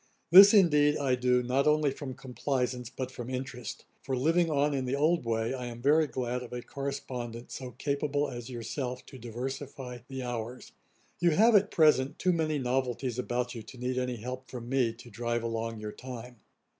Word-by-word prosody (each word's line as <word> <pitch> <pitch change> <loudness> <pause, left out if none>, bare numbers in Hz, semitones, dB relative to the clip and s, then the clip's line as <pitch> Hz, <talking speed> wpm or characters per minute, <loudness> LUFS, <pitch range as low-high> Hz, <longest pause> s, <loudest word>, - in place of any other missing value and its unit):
This, 195 +3 +11
indeed, 150 -7 +5
I 135 -3 +1
do 125 0 +2
not 130 +4 +1
only 150 -2 +3
from 135 -1 -6
complaisance 125 -2 -2
but 130 0 -5
from 120 -1 -7
interest; 130 -3 -5 0.2
for 130 -2 -2
living 165 +6 +3
on 145 -1 +2
in 135 -2 -1
the 125 +2 0
old 155 -1 +2
way, 115 +1 0
I 125 -2 -4
am 120 -1 -7
very 150 +5 +4
glad 125 -2 -3
of 125 - -9
a 125 -1 -5
correspondent 125 -4 -5
so 125 -2 -6
capable 145 0 0
as 120 -2 -7
yourself, 125 +1 -4
to 130 - -12
diversify 125 +2 -6
the 130 -1 -5
hours. 120 0 -5 0.5
You 175 - +4
have, 225 +5 +6
at 205 0 +5
present, 150 -4 +3
too 180 -1 +2
many 155 -2 0
novelties 125 -1 -1
about 125 0 -2
you 115 - -6
to 110 +4 -12
need 125 +1 -1
any 125 -1 -2
help 125 +3 -7
from 120 -2 -7
me 130 -3 +2
to 120 +1 -14
drive 120 -1 -2
along 115 -1 -3
your 105 0 -5
time. 125 0 -9
130 Hz, 190 wpm, -30 LUFS, 120-140 Hz, 0.5 s, This